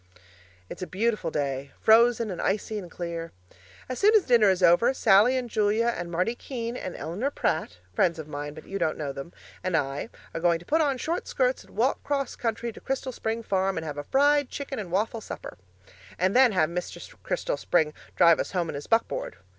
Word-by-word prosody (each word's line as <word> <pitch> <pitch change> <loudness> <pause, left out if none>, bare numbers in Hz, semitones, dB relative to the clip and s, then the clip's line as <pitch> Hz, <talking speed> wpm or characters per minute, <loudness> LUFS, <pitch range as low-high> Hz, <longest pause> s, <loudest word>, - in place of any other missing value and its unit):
It's - - -9
a 185 - -3
beautiful 210 -3 0
day 140 -2 -3
frozen 230 0 +4
and 180 - -4
icy 210 +2 -1
and 180 -3 -9
clear. 170 -1 -5 0.6
As 255 - -4
soon 425 +2 +5
as 425 - +6
dinner 235 -5 +5
is 190 -1 +1
over, 230 +11 +5
Sallie 220 +4 +5
and 250 -1 -2
Julia 220 +1 +1
and 175 0 -5
Marty 180 +7 0
Keene 240 -1 -5
and 185 -7 -5
Eleanor 200 - -2
Pratt 160 - -1 0.2
(friends 170 - +2
of 160 -2 -7
mine, 145 0 -6
but 155 - -11
you 195 +1 -5
don't 160 -3 0
know 145 -3 -3
them) 140 +5 -8 0.3
and 185 -3 +1
I 140 +7 -2 0.2
are 165 - -4
going 170 -1 +3
to 170 - -15
put 320 - +2
on 280 -4 +1
short 330 +7 -3
skirts - - 0
and - - -19
walk - - +1
'cross 280 -2 -2
country 230 0 -2
to - - -13
Crystal 265 0 -3
Spring 225 -1 -3
Farm 195 -2 0
and 160 - -3
have 145 -2 -5
a - - -4
fried 285 - +3
chicken 280 -2 -5
and 190 -5 -6
waffle 220 +4 0
supper, - - -8 0.6
and 185 +4 +1
then 255 -2 +6
have 170 -5 +2
Mr. 180 +1 -6
Crystal - - -2
Spring 155 -3 +1 0.2
drive 170 -1 +6
us - - -3
home 175 -3 0
in - - -4
his 145 - -7
buckboard. - - 0
200 Hz, 210 wpm, -27 LUFS, 170-245 Hz, 0.6 s, as